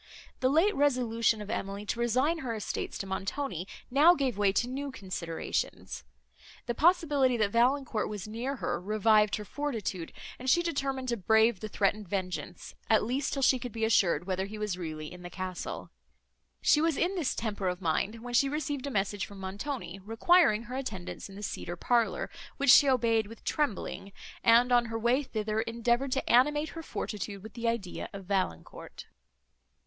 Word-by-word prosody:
The 255 - +2
late 330 +9 +4
resolution 230 -6 +2
of 210 - -7
Emily 200 -1 -4
to 230 - -3
resign 255 +8 +1
her 245 -6 -3
estates 215 - -4
to - - -4
Montoni, 190 - -3 0.2
now 305 +7 +7
gave 270 -6 0
way 200 -1 +3
to 240 - +1
new 275 +3 -4
considerations; 185 -7 -4 0.6
the 240 - -1
possibility, 295 -5 +3
that 210 -3 +1
Valancourt 245 0 +1
was 210 -1 -6
near 240 +6 -3
her, 240 - -2
revived 215 +1 +3
her 210 - -6
fortitude, 220 - -4 0.3
and 255 +1 -2
she 345 +6 +4
determined 270 -5 -2
to 235 - 0
brave 220 +1 +3
the 215 - -5
threatened 205 0 0
vengeance, 180 -1 -4 0.2
at 220 - +4
least, 260 +5 -1
till 275 - -1
she 260 0 +4
could 245 0 -6
be 225 +1 -1
assured 175 -7 +3
whether 190 0 -2
he 215 +2 -8
was 210 -3 -2
really 155 -3 -6
in 180 - -11
the 175 - -7
castle. 185 -1 -6 0.7
She 300 - +5
was 325 -2 +1
in 360 +3 +1
this 335 -9 -1
temper 205 -4 -2
of 180 0 -1
mind, 195 +6 -1
when 245 0 -6
she 275 +3 +4
received 290 -2 -3
a - - -2
message 200 -4 -1
from 200 - -12
Montoni, 195 0 -5
requiring 225 - +4
her 245 +2 -7
attendance 215 -9 -5
in 195 - -11
the 205 - -8
cedar 175 -3 -4
parlour, 230 +1 +1 0.3
which 280 -3 +5
she 280 +2 +8
obeyed 230 -4 +2
with 225 +2 -12
trembling, 210 -7 -2 0.3
and, 240 +2 +5
on 240 -1 +5
her 225 0 -3
way 240 +5 +2
thither, 215 -4 -2
endeavoured 235 +4 0
to 270 - -2
animate 295 +5 +4
her 330 - -7
fortitude 205 - -5
with 220 -1 -10
the 235 +1 -3
idea 230 -6 -3
of 195 -1 -8
Valancourt. 185 - -3
230 Hz, 180 wpm, -30 LUFS, 200-265 Hz, 0.7 s, she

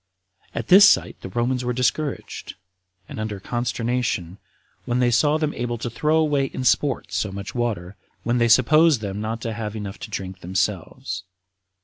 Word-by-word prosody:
At 115 - -4
this 200 +3 +9
sight - - +1
the - - -7
Romans 120 +5 -1
were 125 0 -1
discouraged, 130 +4 -2 0.5
and - - -8
under 110 -2 -4
consternation, 120 -5 -2 0.5
when 120 -1 0
they 125 -1 +3
saw 150 +6 +3
them 155 -1 -1
able 120 -1 -3
to 115 +1 -4
throw 150 +7 +1
away 150 -3 +2
in 130 - -5
sport 130 -5 +1
so 95 +2 -1
much 100 +1 -6
water, 105 -6 -3 0.3
when 120 +1 +1
they 120 - +4
supposed 150 +3 +5
them 100 -1 -4
not 110 +1 -3
to 115 -1 -3
have 105 -1 -5
enough 100 -2 -6
to - - -7
drink 95 -1 -5
themselves. 95 0 -2
120 Hz, 170 wpm, -23 LUFS, 105-130 Hz, 0.5 s, this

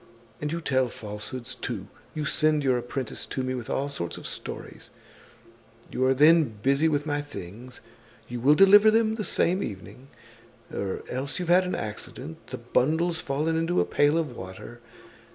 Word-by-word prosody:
"And 150 0 -2
you 170 +1 -2
tell 130 -4 +2
falsehoods 115 +3 -6
too; 115 -6 -5 0.3
you 155 -1 -2
send 155 +1 +2
your 130 -2 +3
apprentice 120 0 -4
to 130 - -3
me 130 0 -2
with 125 -3 -5
all 140 - 0
sorts 85 -12 -3
of - - -10
stories; - - -7 1.0
you 130 - -1
are 130 0 +3
then 160 +4 +7 0.2
busy 140 +4 +3
with 145 -2 0
my 145 -1 -1
things, 125 -3 -9 0.5
you 120 0 -5
will 140 +5 +5
deliver 205 +4 +8
them 220 0 +3
the 220 -1 -3
same 185 -1 +1
evening, 110 - -7 0.7
or 100 -1 -3
else 130 +3 -3
you've 180 -2 -3
had 180 +1 +5
an 180 - -2
accident, 130 +9 -7
the 130 - -6
bundle's 160 +8 +1
fallen 150 +4 -1
into 165 +2 +1
a - - +3
pail 145 +2 +3
of 150 -7 -2
water. 95 +6 -9
140 Hz, 170 wpm, -27 LUFS, 125-160 Hz, 1.0 s, deliver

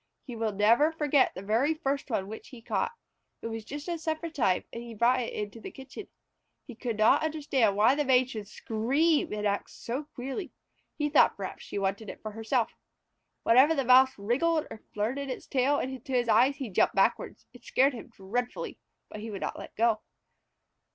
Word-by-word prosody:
He 245 - -7
will 225 -1 -1
never 230 +10 +4
forget 295 -4 +2
the 185 - -7
very 235 +10 +1
first 280 -3 -2
one 195 -5 -1
which 220 +2 -9
he 255 -4 -12
caught. 465 - -2 0.5
It 230 - -3
was 225 -1 -5
just 290 +7 -7
at 340 -1 -2
supper 315 +1 -3
time 225 - +1
and 235 - -5
he 235 -1 -9
brought 240 +4 +3
it 235 - -4
into 210 +2 -5
the - - -7
kitchen. 270 +10 -10 0.6
He 250 - -9
could 230 -1 -4
not 215 +1 +5
understand 285 -9 +1
why 215 +5 +5
the 295 +1 0
Maid 255 -1 +3
should 215 -4 -6
scream 275 +11 +1
and 210 0 -3
act 200 0 -1
so 260 +6 -5
queerly. 270 +9 -5 0.4
He 295 - 0
thought 295 - +4
perhaps - - -6
she - - -6
wanted 200 +2 -2
it - - -8
herself. 225 +2 -1 0.7
Whenever 265 +7 +5
the 275 -3 0
Mouse 260 +1 +6
wriggled 280 +10 +1
or 220 - -9
flirted 255 +7 -2
its 255 - -5
tail 275 +2 +2
into 260 0 -4
his 245 -1 +2
eyes 260 +4 +4
he 270 -5 -5
jumped - - +2
backward. - - +1 0.2
It 245 - -16
scared 270 +2 +3
him 235 - -8
dreadfully, 235 +3 -4 0.3
but 215 - -9
he 220 +2 -6
would 200 -3 -6
not - - -4
let - - -10
go. 225 -1 +2
250 Hz, 195 wpm, -29 LUFS, 220-280 Hz, 0.7 s, Mouse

